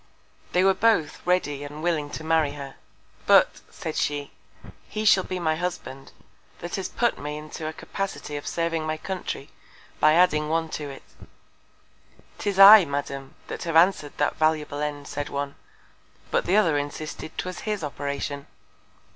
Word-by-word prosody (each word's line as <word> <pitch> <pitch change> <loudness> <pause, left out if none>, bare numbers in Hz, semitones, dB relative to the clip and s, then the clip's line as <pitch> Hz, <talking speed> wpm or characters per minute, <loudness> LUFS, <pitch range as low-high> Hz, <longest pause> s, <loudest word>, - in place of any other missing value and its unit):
They 180 - +4
were 195 0 +5
both 190 -6 +1
ready 145 -6 +1
and 145 +2 -8
willing 160 -4 0
to 155 - -7
marry 160 -2 +2
her. 140 -2 -8 0.5
But, - - +5
said - - -6
she, 145 -1 -1 0.6
he 215 0 -3
shall 195 -3 +6
be 185 - -4
my 160 -3 0
Husband, 150 -6 -5 0.5
that 175 - -8
has 190 - -3
put 240 -1 0
me 150 +1 -5
into 155 +1 -7
a - - -2
Capacity 195 -6 -5
of 145 - -6
serving 165 -2 -1
my 155 0 -1
Country, 175 -5 -5 0.5
by 155 0 +5
adding 155 -4 +3
one 165 0 0
to 150 -2 -5
it. 135 - -10 1.4
'Tis 200 -2 -2
I, 200 +1 +11
Madam, 140 -2 -5
that - - -7
have 165 -1 -2
answered 165 -3 +4
that 145 - 0
valuable 155 -2 +1
End, 145 -1 -4
said 145 0 -4
one; 140 0 -3 0.8
but - - +1
the 190 +4 +4
other 165 -8 +3
insisted 150 +2 -6
'twas 185 0 -4
his 210 -4 -3
Operation. 140 0 -4
155 Hz, 160 wpm, -25 LUFS, 145-180 Hz, 1.4 s, I